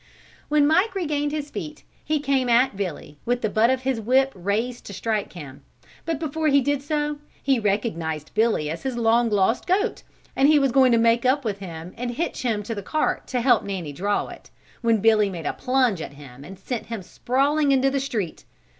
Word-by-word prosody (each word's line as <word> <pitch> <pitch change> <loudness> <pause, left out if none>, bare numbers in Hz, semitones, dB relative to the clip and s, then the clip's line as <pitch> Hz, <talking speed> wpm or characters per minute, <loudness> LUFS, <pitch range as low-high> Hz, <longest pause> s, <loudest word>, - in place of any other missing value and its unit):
When 300 -1 +4
Mike 365 +7 +2
regained 295 -5 -1
his 295 -1 -4
feet 305 0 -7 0.2
he 305 0 0
came 270 -3 0
at 240 -1 +3
Billy 175 -6 -5
with 245 +1 -1
the 215 - 0
butt 225 +2 +3
of 260 0 0
his 260 -3 -1
whip 265 +4 +3
raised 210 +7 -2
to 200 - -7
strike 210 +2 -2
him, 145 -6 -10 0.4
but 330 -2 -1
before 315 +1 -2
he 280 -1 +5
did 285 +1 0
so, 295 0 -2 0.2
he 270 -3 +2
recognized 170 -8 -2
Billy 220 -9 +1
as 160 +3 -4
his 260 -3 -3
long 230 0 +3
lost 210 +3 +1
goat, 405 +5 +1 0.3
and 275 +2 +4
was 275 -2 +2
going 260 0 +5
to 235 - +4
make 230 +1 +3
up 260 +1 +2
with 205 -3 -2
him 170 -2 -8
and 245 +1 -3
hitch 285 +9 -3
him 225 -5 -1
to 225 - -4
the 205 - -5
cart 310 +10 -1
to 250 -1 -1
help 240 -3 +4
Nanny 180 -7 -5
draw 200 +7 -1
it, - - -12 0.3
when 230 -3 +2
Billy 215 -2 +4
made 170 -4 -7
a - - -1
plunge 250 -8 +1
at 145 - -7
him 140 -2 -13
and 190 +6 -10
sent 230 +5 -5
him 230 -4 -5
sprawling 280 +8 +1
into 270 0 +3
the 275 - 0
street. 225 -11 -3
240 Hz, 210 wpm, -24 LUFS, 200-275 Hz, 0.4 s, he